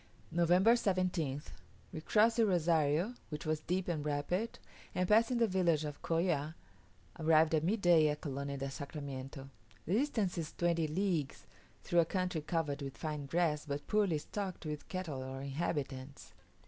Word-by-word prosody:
November 175 Hz, +6 st, +5 dB
17th. 180 Hz, -, 0 dB, 0.5 s
We 155 Hz, -, -5 dB
crossed 225 Hz, +6 st, +3 dB
the 230 Hz, -, +5 dB
Rozario, 165 Hz, +2 st, +2 dB, 0.2 s
which 150 Hz, -2 st, -6 dB
was 155 Hz, 0 st, 0 dB
deep 180 Hz, +4 st, -2 dB
and 160 Hz, -4 st, -1 dB
rapid, 150 Hz, +9 st, -1 dB, 0.4 s
and 180 Hz, 0 st, +1 dB
passing 225 Hz, +4 st, +4 dB
the 235 Hz, -, +4 dB
village 170 Hz, -5 st, +2 dB
of 145 Hz, -1 st, -6 dB
Colla, 165 Hz, -2 st, 0 dB, 0.6 s
arrived 160 Hz, 0 st, +4 dB
at 155 Hz, -1 st, +2 dB
midday 175 Hz, -5 st, +4 dB
at 150 Hz, 0 st, -1 dB
Colonia 140 Hz, -1 st, -4 dB
del 135 Hz, 0 st, -3 dB
Sacramiento. 140 Hz, -1 st, -6 dB, 0.4 s
The 170 Hz, -, -1 dB
distance 220 Hz, -7 st, +1 dB
is 160 Hz, -2 st, -5 dB
twenty 170 Hz, -2 st, +1 dB
leagues, 155 Hz, -, -1 dB, 0.4 s
through 175 Hz, -, +2 dB
a 170 Hz, -, +5 dB
country 180 Hz, -2 st, -1 dB
covered 150 Hz, -2 st, -2 dB
with 135 Hz, -1 st, -6 dB
fine 150 Hz, -3 st, -4 dB
grass, 155 Hz, -1 st, 0 dB
but 145 Hz, 0 st, -3 dB
poorly 205 Hz, -7 st, +2 dB
stocked 190 Hz, +3 st, -5 dB
with 150 Hz, -1 st, -5 dB
cattle 170 Hz, -8 st, -4 dB
or 130 Hz, +1 st, -6 dB
inhabitants. 140 Hz, -2 st, -4 dB
160 Hz, 155 wpm, -34 LUFS, 145-185 Hz, 0.6 s, November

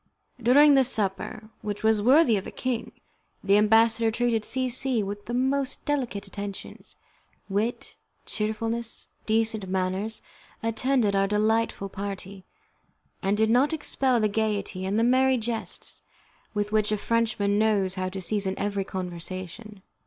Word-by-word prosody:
During 285 Hz, +5 st, +6 dB
the 270 Hz, -1 st, +6 dB
supper, 215 Hz, -2 st, -2 dB
which 210 Hz, 0 st, -5 dB
was 220 Hz, -1 st, +3 dB
worthy 255 Hz, +1 st, +5 dB
of 195 Hz, -, -3 dB
a -, -, -7 dB
king, 255 Hz, -3 st, -3 dB, 0.5 s
the 200 Hz, 0 st, +4 dB
ambassador 225 Hz, +2 st, +4 dB
treated 230 Hz, -1 st, 0 dB
C 260 Hz, +3 st, -1 dB
C 250 Hz, -2 st, +1 dB
with 205 Hz, +1 st, -6 dB
the 240 Hz, -, -4 dB
most 265 Hz, +1 st, 0 dB
delicate 250 Hz, -8 st, -1 dB
attentions. 200 Hz, 0 st, -7 dB, 0.5 s
Wit, 210 Hz, +5 st, -2 dB, 0.3 s
cheerfulness, 225 Hz, +2 st, -3 dB, 0.2 s
decent 220 Hz, -3 st, +1 dB
manners, 190 Hz, +4 st, -1 dB, 0.4 s
attended 230 Hz, -1 st, +1 dB
our 195 Hz, 0 st, +3 dB
delightful 215 Hz, 0 st, +1 dB
party, 195 Hz, -1 st, -7 dB, 0.8 s
and 195 Hz, +2 st, +1 dB
did 220 Hz, +1 st, +3 dB
not 265 Hz, +6 st, +3 dB
expel 270 Hz, -5 st, +1 dB
the 215 Hz, -, +3 dB
gaiety 205 Hz, -3 st, -2 dB
and 200 Hz, +2 st, 0 dB
the 225 Hz, -, +3 dB
merry 260 Hz, +2 st, +4 dB
jests 225 Hz, -1 st, -4 dB, 0.5 s
with 205 Hz, 0 st, -1 dB
which 215 Hz, -1 st, +2 dB
a 215 Hz, -, +1 dB
Frenchman 210 Hz, -2 st, +1 dB
knows 205 Hz, -4 st, +2 dB
how 185 Hz, -1 st, -2 dB
to 190 Hz, +1 st, -6 dB
season 195 Hz, 0 st, 0 dB
every 200 Hz, -1 st, -1 dB
conversation. 185 Hz, +3 st, -6 dB
215 Hz, 140 wpm, -26 LUFS, 200-235 Hz, 0.8 s, During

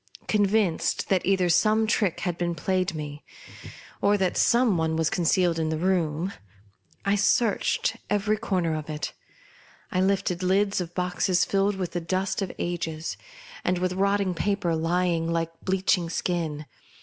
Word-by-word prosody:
Convinced 205 Hz, -4 st, +1 dB
that 190 Hz, -2 st, +2 dB
either 190 Hz, -1 st, +2 dB
some 215 Hz, +6 st, +3 dB
trick 210 Hz, -5 st, 0 dB
had 175 Hz, -3 st, -1 dB
been 175 Hz, -1 st, -2 dB
played 185 Hz, +2 st, -1 dB
me, 150 Hz, -1 st, -6 dB, 0.8 s
or 205 Hz, +1 st, +3 dB
that 190 Hz, -2 st, 0 dB
some 235 Hz, -4 st, +3 dB
one 160 Hz, -1 st, 0 dB
was 160 Hz, -1 st, +1 dB
con 175 Hz, -, -1 dB
cealed 175 Hz, -1 st, +2 dB
in 160 Hz, -1 st, 0 dB
the 160 Hz, -, -1 dB
room, 175 Hz, 0 st, 0 dB, 0.7 s
I 200 Hz, -, +3 dB
searched 205 Hz, +2 st, +1 dB
every 210 Hz, +1 st, +1 dB
corner 185 Hz, -7 st, -1 dB
of 155 Hz, 0 st, -5 dB
it. 150 Hz, -1 st, -4 dB, 0.8 s
I 185 Hz, -2 st, +1 dB
lifted 190 Hz, -2 st, 0 dB
lids 195 Hz, +1 st, +2 dB
of 175 Hz, 0 st, -7 dB
boxes 180 Hz, 0 st, +1 dB
filled 195 Hz, +2 st, +1 dB
with 185 Hz, -2 st, -3 dB
the 175 Hz, -, -3 dB
dust 185 Hz, +4 st, -1 dB
of 195 Hz, -, -2 dB
ages, 165 Hz, -2 st, -3 dB, 0.5 s
and 180 Hz, 0 st, +1 dB
with 180 Hz, +1 st, -1 dB
rotting 200 Hz, 0 st, +1 dB
paper 180 Hz, -1 st, 0 dB
lying 165 Hz, 0 st, 0 dB
like 165 Hz, 0 st, -1 dB
bleaching 185 Hz, -2 st, +1 dB
skin. 165 Hz, -4 st, -2 dB
180 Hz, 155 wpm, -26 LUFS, 165-195 Hz, 0.8 s, some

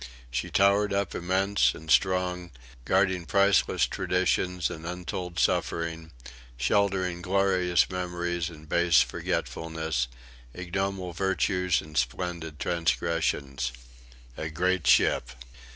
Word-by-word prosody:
She 60 Hz, 0 st, -2 dB
towered 100 Hz, +1 st, +3 dB
up 100 Hz, 0 st, -1 dB
immense 95 Hz, +3 st, +1 dB
and 80 Hz, +1 st, -7 dB
strong, 90 Hz, -2 st, +2 dB, 0.4 s
guarding 95 Hz, -1 st, +1 dB
priceless 100 Hz, -9 st, +3 dB
traditions 90 Hz, +4 st, 0 dB
and 80 Hz, -, -8 dB
untold 90 Hz, 0 st, -5 dB
suffering, 80 Hz, -1 st, -1 dB, 0.5 s
sheltering 95 Hz, -, +1 dB
glorious 90 Hz, -2 st, +2 dB
memories 85 Hz, -2 st, -3 dB
and 80 Hz, -2 st, -13 dB
base 85 Hz, -4 st, +4 dB
forgetfulness, 80 Hz, +1 st, -3 dB, 0.5 s
ignoble 90 Hz, 0 st, -3 dB
virtues 90 Hz, -1 st, +1 dB
and 75 Hz, 0 st, -13 dB
splendid 80 Hz, +4 st, -2 dB
transgressions. 80 Hz, -6 st, -1 dB, 0.7 s
A 80 Hz, -, -4 dB
great 90 Hz, +2 st, 0 dB
ship! 65 Hz, -, +3 dB
90 Hz, 100 wpm, -27 LUFS, 80-95 Hz, 0.7 s, base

